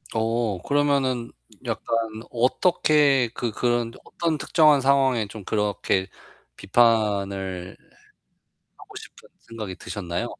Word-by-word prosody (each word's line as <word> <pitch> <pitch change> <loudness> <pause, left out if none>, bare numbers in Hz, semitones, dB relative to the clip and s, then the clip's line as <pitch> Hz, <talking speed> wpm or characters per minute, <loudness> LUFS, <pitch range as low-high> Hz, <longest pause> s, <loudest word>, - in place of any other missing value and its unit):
어 110 -3 -1
그러면은 140 -2 0 0.3
약간 - - -2 0.4
어떻게 140 +1 +3
그 120 -2 -3
그런 120 +1 0
어떤 165 -2 -2
특정한 150 0 +4
상황에 135 -4 +2
좀 105 0 -10
그렇게 100 -2 -1 0.5
비판을 100 - 0 1.0
하고 - - -15
싶은 - - -12 0.2
생각이 110 -5 -7
드셨나요? 85 -4 -4
115 Hz, 225 characters per minute, -24 LUFS, 100-135 Hz, 1.0 s, 특정한